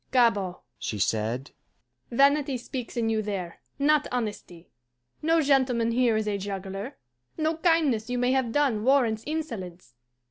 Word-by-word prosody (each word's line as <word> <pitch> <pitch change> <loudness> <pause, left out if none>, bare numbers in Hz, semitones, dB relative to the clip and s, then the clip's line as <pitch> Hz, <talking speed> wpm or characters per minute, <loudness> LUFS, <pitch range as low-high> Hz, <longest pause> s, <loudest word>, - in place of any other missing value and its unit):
"Gabord," 225 -8 +2 0.2
she 105 - -3
said, 110 +6 -1 0.6
"vanity 280 +1 +3
speaks 250 0 -6
in 230 -1 +1
you 220 -1 +1
there, 195 -5 -5 0.2
not 295 +1 +3
honesty. 210 -8 -5 0.5
No 325 +1 +3
gentleman 260 -5 +2
here 235 -2 +2
is 215 0 -1
a 205 -1 -1
juggler. 195 +5 -5 0.4
No 315 0 0
kindness 315 -10 +2
you 250 - -1
may 245 +1 +2
have 260 -3 +1
done 255 -6 +1
warrants 240 -4 +3
insolence. 200 - -5
235 Hz, 140 wpm, -27 LUFS, 200-275 Hz, 0.6 s, vanity